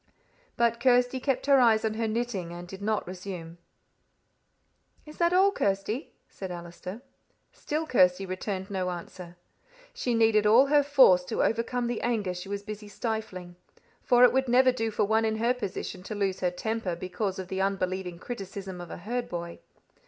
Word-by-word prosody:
But 235 0 +2
Kirsty 245 +1 +3
kept 270 0 -1
her 275 -1 +5
eyes 225 -3 +4
on 220 - 0
her 225 +1 -1
knitting, 215 -6 -2
and 175 +1 -8
did 190 +2 -9
not 215 +1 -1
resume. 180 -2 -8 1.5
"Is 305 0 -12
that 340 0 +3
all, 380 +2 +5
Kirsty?" 200 - -2 0.2
said 190 - -8
Allister. 180 +5 -8 0.5
Still 310 +2 -3
Kirsty 190 - +3
returned 190 +1 -4
no 185 -2 -1
answer. 175 0 -8 0.6
She 245 -2 -1
needed 220 -2 +4
all 235 +6 +7
her 290 +1 +4
force 270 -11 +5
to 220 - -1
overcome 235 +2 0
the 240 0 -2
anger 215 -6 -1
she 180 +2 -8
was 200 0 -4
busy 210 0 -7
stifling. 205 -5 -5 0.4
For 245 0 +4
it 250 - +7
would 265 0 +1
never 255 +2 +5
do 225 -3 -2
for 215 - 0
one 220 +2 +2
in 220 0 0
her 230 +3 +2
position 195 -5 -5
to 210 +3 -6
lose 195 -2 -1
her 180 - +1
temper 210 0 -3
because 185 +2 -3
of 190 -1 -5
the 190 0 -2
unbelieving 185 -2 -2
criticism 195 -3 -7
of 175 - -9
a - - -7
herd 240 +7 -4
boy. 170 -1 -6
210 Hz, 175 wpm, -28 LUFS, 185-240 Hz, 1.5 s, all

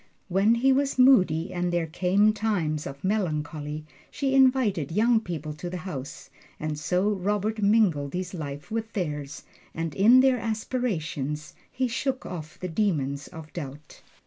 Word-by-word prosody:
When 195 +5 +4
he 265 +3 +4
was 275 0 0
moody 185 - +4
and 175 0 -1
there 175 -1 0
came 185 +6 +2
times 175 -9 -1
of 140 0 -9
melancholy, 155 -6 -2 0.2
she 270 -2 -1
invited 255 - +3
young 225 +5 +3
people 160 -7 -5
to 165 +4 -6
the 180 - -4
house; 140 -7 -7 0.3
and 155 0 -2
so 180 +6 +1
Robert 210 +2 -1
mingled 195 -9 +2
his 185 0 -4
life 145 -3 -6
with 225 0 -3
theirs, 150 -7 -4 0.3
and 165 -2 -3
in 235 +6 +6
their 260 -2 +3
aspirations 185 - -3 0.2
he 255 0 0
shook 260 +3 -2
off 160 -4 -7
the 185 - -3
demons 150 -7 -1
of 155 -2 -11
doubt. 145 -1 -8
180 Hz, 150 wpm, -26 LUFS, 155-220 Hz, 0.3 s, in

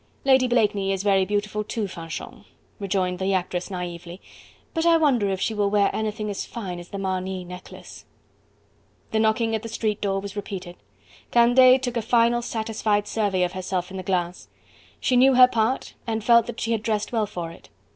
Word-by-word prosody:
"Lady 265 -1 +5
Blakeney 210 -5 +1
is 195 0 -2
very 195 -2 +3
beautiful 210 +1 -2
too, 215 0 -3
Fanchon," 165 -3 -8 0.4
rejoined 185 -2 -1
the 190 0 +1
actress 180 0 -2
naively, 175 -1 -6 0.5
"but 325 - 0
I 335 -1 +5
wonder 260 -10 +2
if 190 -1 -2
she 220 - -1
will 205 -1 +1
wear 200 -1 +2
anything 215 0 -3
as 200 - -4
fine 190 -7 -6
as 175 - -11
the 200 - -6
Marny 185 -1 -3
necklace?" 180 +1 -11 1.1
The 220 - +1
knocking 220 +1 +1
at 220 - -1
the 230 - -7
street 215 -2 -2
door 195 -1 0
was 200 0 -7
repeated. 190 -3 -6 0.5
Candeille 255 +2 +6
took 245 -2 -3
a - - +1
final, 235 +1 +3
satisfied 220 -3 -1
survey 200 -4 0
of 175 - 0
herself 185 -1 -3
in 190 - -6
the - - -4
glass. 180 -1 -2 0.5
She 255 - +1
knew 260 +1 +5
her 250 0 +9
part 235 +1 -1
and 220 -1 -2
felt 235 0 +5
that 240 - -6
she 230 - -2
had 225 -2 0
dressed 215 -1 -2
well 220 -3 0
for 175 -4 -6
it. 170 - -16
205 Hz, 190 wpm, -24 LUFS, 185-230 Hz, 1.1 s, her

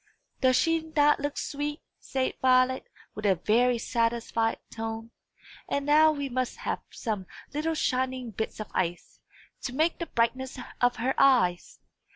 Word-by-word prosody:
"Does 255 -1 +4
she 330 +4 +3
not 295 0 +5
look 290 0 -3
sweet?" 295 +1 -3 0.2
said 265 -1 -2
Violet, 255 0 +3 0.3
with 210 - -7
a 190 - +4
very 235 +7 +2
satisfied 230 -1 0
tone; 225 0 -5 0.6
"and 280 0 -1
now 310 +2 +6
we 285 -2 -3
must 255 -1 -2
have - - -2
some 210 -6 -4 0.3
little 315 +2 -1
shining 255 -4 -1
bits 220 +2 -4
of 215 - -6
ice, 175 -2 -2 0.4
to 250 - -4
make 320 +4 +1
the 335 - -3
brightness 255 +3 -1 0.2
of 245 0 +4
her 260 +3 0
eyes. 235 -11 +3
255 Hz, 150 wpm, -28 LUFS, 230-285 Hz, 0.6 s, now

